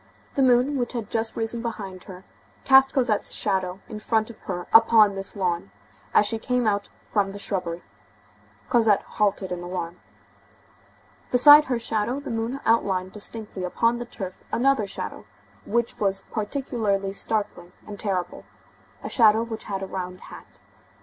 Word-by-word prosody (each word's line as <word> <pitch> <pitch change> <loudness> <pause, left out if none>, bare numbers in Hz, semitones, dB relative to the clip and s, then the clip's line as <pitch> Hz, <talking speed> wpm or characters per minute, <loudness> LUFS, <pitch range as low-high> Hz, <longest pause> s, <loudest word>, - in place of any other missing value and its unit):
The 275 - 0
moon, 255 +2 +3
which 240 0 -2
had 230 -4 -5
just 225 -1 -1
risen 225 +1 -2
behind 200 -6 -6
her, 185 -1 -11 0.4
cast 270 0 +6
Cosette's 240 -6 0
shadow 190 0 -2
in 215 - -7
front 220 +1 0
of 220 - -17
her 180 -1 -3
upon 225 -2 +7
this 195 +2 -6
lawn, 180 -1 -1 0.4
as - - +4
she 225 +1 -1
came 250 +1 0
out 205 -1 0 0.2
from 200 -2 +2
the - - -7
shrubbery. 180 -4 -4 0.8
Cosette 225 -5 +3
halted 200 -2 -1
in 180 -1 -3
alarm. 175 -1 -5 1.3
Beside 290 +4 +8
her 250 -2 -1
shadow, 230 +3 -2
the 285 - -7
moon 230 +4 -3
outlined 190 -5 +1
distinctly 210 -2 -5
upon 230 +6 +1
the 240 - -5
turf 190 -6 -7
another 260 -4 +2
shadow, - - -6 0.4
which 235 +1 -1
was 195 -1 0
particularly 210 -4 -2
startling 200 -4 -2
and 205 -1 -9
terrible, 185 -4 -3 0.6
a - - -4
shadow 220 -1 +5
which 225 -1 -6
had 195 -2 -4
a - - -2
round 180 -1 -6
hat. - - -12
215 Hz, 155 wpm, -24 LUFS, 195-235 Hz, 1.3 s, Beside